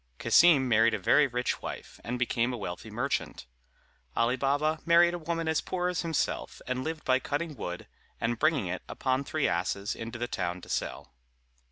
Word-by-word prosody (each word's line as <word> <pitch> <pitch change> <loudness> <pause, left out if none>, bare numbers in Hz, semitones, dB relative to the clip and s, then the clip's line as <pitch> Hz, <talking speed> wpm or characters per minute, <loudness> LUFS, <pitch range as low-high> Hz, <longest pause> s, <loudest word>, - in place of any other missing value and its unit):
Cassim 150 - +5
married 115 -1 +4
a - - -1
very 140 +9 +4
rich 125 -1 -2
wife, - - -7
and 125 +1 -3
became 120 0 +1
a 125 - -4
wealthy 95 +1 -6
merchant. 120 - -2 0.7
Ali 115 +2 +2
Baba 145 +4 +1
married 170 +1 +5
a 175 - -3
woman 165 0 -2
as 160 -1 +1
poor 180 -1 -1
as 180 - -1
himself, 165 -2 -2
and 130 0 -2
lived 160 +1 -4
by 130 0 +3
cutting 150 +3 -3
wood, 90 -6 -5 0.3
and 115 0 -1
bringing - - +2
it - - -3
upon 130 +1 0
three - - 0
asses 100 +1 -1
into 115 +1 -6
the 120 0 -2
town 90 -6 -3
to - - -13
sell. 65 - -3
130 Hz, 185 wpm, -29 LUFS, 115-160 Hz, 0.7 s, Cassim